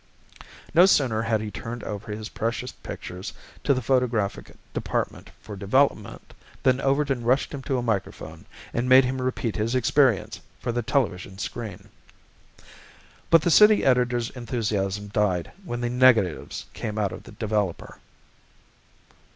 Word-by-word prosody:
No 175 +4 +7
sooner 125 - +3
had 115 -1 0
he 110 -1 -5
turned 115 +4 -6
over 105 +1 -6
his 105 0 -5
precious 115 +2 -3
pictures 90 +1 -8 0.3
to - - +2
the 130 -2 +1
photographic 115 -5 0 0.2
department - - -3
for 105 - -9
development 105 +2 0 0.3
than 130 0 +3
Overton 135 -2 +1
rushed 130 +6 +1
him 140 - -5
to 135 0 -1
a 125 - -2
microphone, 110 -5 -3 0.3
and 120 +2 -1
made 130 0 +8
him 130 +1 -2
repeat 125 -3 -2
his 115 +3 -1
experience 130 -2 +2 0.2
for 120 - -2
the 120 +1 -1
television 100 -7 -1
screen. 105 +1 -6 1.4
But 165 -2 +6
the 175 - +2
city 210 +4 +6
editor's 125 -2 +2
enthusiasm 105 -5 -2
died 100 -5 0
when 120 -9 -4
the 120 - -1
negatives 125 -9 +2
came 105 0 -5
out 105 -2 0
of - - -8
the - - -14
developer. 105 -5 -2
120 Hz, 145 wpm, -25 LUFS, 105-130 Hz, 1.4 s, made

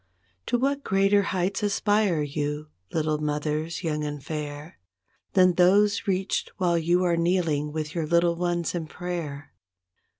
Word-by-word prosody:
To 245 - +2
what 275 +3 0
greater 195 +1 +3
heights 190 +1 -1
aspire 205 -5 +1
you, 150 +1 -3 0.2
little 155 -1 0
mothers 150 +3 -2
young 150 -2 -1
and 145 -2 -5
fair, 150 0 -6 0.5
Than 185 -1 +5
those 200 +5 +3
reached 190 0 -1
while 175 -2 +2
you 175 +2 +2
are 175 -1 +2
kneeling 170 -4 +1
with 155 0 -4
your 165 -3 -2
little 170 +1 +3
ones 175 -1 -1
in 165 -3 -3
prayer. 165 -5 -6
170 Hz, 140 wpm, -26 LUFS, 150-185 Hz, 0.5 s, Than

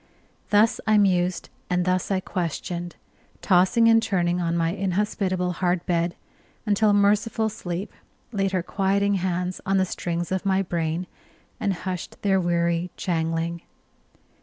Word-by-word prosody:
Thus 210 +2 +3
I 215 -1 +5
mused, 185 -3 +2 0.2
and 180 -1 +1
thus 185 0 0
I 190 -2 +1
questioned, 175 0 -4 0.5
tossing 190 +5 +4
and 225 0 +6
turning 180 -5 0
on 170 0 0
my 165 0 +1
inhospitable 190 -1 -1
hard 180 -1 +1
bed, 170 0 0 0.5
until 210 0 +3
merciful 210 +2 +2
sleep 190 -3 -5 0.4
laid 195 -3 0
her 185 -2 0
quieting 200 +2 +1
hands 180 -1 -2
on 195 +1 +1
the 190 - +3
strings 175 -1 -3
of 190 -1 -1
my 195 -1 +2
brain, 170 -1 -2 0.5
and 200 - 0
hushed 180 -1 -5
their 195 -2 +3
weary 170 0 0
jangling. 165 -1 -1
185 Hz, 135 wpm, -24 LUFS, 175-200 Hz, 0.5 s, and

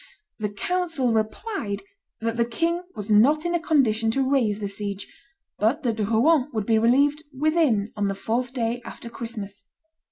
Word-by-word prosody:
The 210 -1 -1
council 325 - -1
replied 220 - -2 0.4
that 230 0 -1
the 235 - +2
king 335 +9 -1
was 210 0 -4
not 285 +10 +5
in 345 - 0
a 345 - +2
condition 235 -9 +2
to 265 +3 +1
raise 245 -7 +2
the 205 - -2
siege, 200 0 -4 0.5
but 245 +9 +1
that 230 -3 -1
Rouen 250 +7 +3
would 215 -3 -1
be 225 0 +3
relieved 280 +6 +3 0.2
"within" 290 -9 +2
on 205 -1 0
the 195 - -1
fourth 240 +5 -2
day 240 -2 -2
after 235 0 -9
Christmas. 205 -4 -6
230 Hz, 165 wpm, -24 LUFS, 215-290 Hz, 0.5 s, not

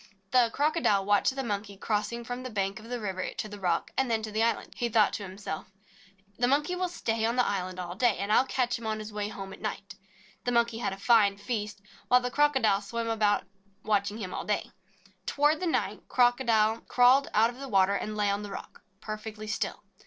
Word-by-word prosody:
The 250 -2 +5
Crocodile 290 - +2
watched 205 +6 +3
the 270 - -2
Monkey 205 -3 -4
crossing 220 +3 -2
from 245 +1 -5
the 255 - -6
bank 200 -2 -2
of 225 +2 -12
the 245 0 -3
river 190 -4 -3
to - - -3
the 205 -1 -9
rock, 175 -3 0
and 265 -2 +1
then 225 -1 0
to 215 - -5
the 215 +1 0
island. 230 0 0
He 240 - -1
thought 215 -2 +4
to 205 - -4
himself, 185 -3 -6 0.7
"The 245 - +3
Monkey 295 +7 +1
will 365 0 -1
stay 225 -9 -2
on 230 +2 +1
the 250 - +3
island 185 -2 -2
all 175 -1 -4
day, 230 +2 +2
and 200 +1 -2
I - - +6
'11 260 - +3
catch 245 -2 0
him 230 - -6
on 215 0 -1
his 215 0 -7
way 210 -1 -2
home 195 -2 -7
at - - -13
night." 200 -2 -5 0.5
The 245 - 0
Monkey 235 -1 +2
had 240 - -1
a 195 - -6
fine 205 -2 +4
feast, 205 -2 -4 0.2
while 250 - +6
the 250 0 -3
Crocodile 265 -9 +3
swam 230 +3 -3
about, 215 -2 +2 0.4
watching 205 0 0
him 190 -5 -5
all - - -3
day. 210 - -2 0.6
Toward 295 +3 +2
night 350 -3 0
the - - -33
Crocodile 235 -3 +3
crawled 255 +3 +5
out 225 +2 +5
of 245 - -14
the 275 -1 -6
water 195 -2 +4
and 210 +1 -3
lay 205 -1 +2
on 200 +1 -1
the 205 - -7
rock, - - -9 0.2
perfectly 215 0 -6
still. 210 - -3
220 Hz, 225 wpm, -29 LUFS, 205-245 Hz, 0.7 s, I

